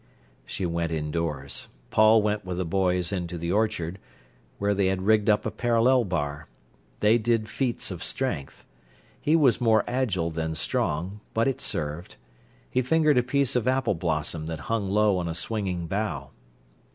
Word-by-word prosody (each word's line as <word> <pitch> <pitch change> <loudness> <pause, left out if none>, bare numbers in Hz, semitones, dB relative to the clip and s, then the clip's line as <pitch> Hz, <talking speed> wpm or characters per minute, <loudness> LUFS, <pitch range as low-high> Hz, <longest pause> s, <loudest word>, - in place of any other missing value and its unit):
She 95 - -3
went 85 -1 -1
indoors. 75 -3 -2 0.2
Paul 110 0 +6
went 105 0 0
with 90 -1 -4
the 90 - -1
boys 90 0 +1
into 90 -3 -3
the 85 +1 -3
orchard, 95 -4 0 0.6
where 100 0 +1
they 100 -1 +2
had 95 0 -1
rigged 110 +1 +3
up 105 - +3
a 110 - -1
parallel 120 +3 +3
bar. 75 -4 -3 0.5
They 110 +3 +5
did 115 -1 +1
feats 120 +1 -2
of - - -6
strength. 70 -1 -3 0.6
He 155 - +3
was 135 -9 +4
more 110 -2 +4
agile 105 -10 -1
than 80 0 -3
strong, 85 +5 -1 0.2
but 115 +2 +2
it 135 - -1
served. 75 +4 -3 0.5
He 130 - +1
fingered 150 +1 +3
a - - +4
piece 135 +1 0
of 125 -1 +1
apple 130 -4 +2
blossom 80 -2 -2
that 80 -3 -5
hung 105 -4 0
low 105 -1 +3
on 85 - -2
a 80 - -3
swinging 90 -1 -2
bough. 85 -8 -3
100 Hz, 165 wpm, -26 LUFS, 85-115 Hz, 0.6 s, Paul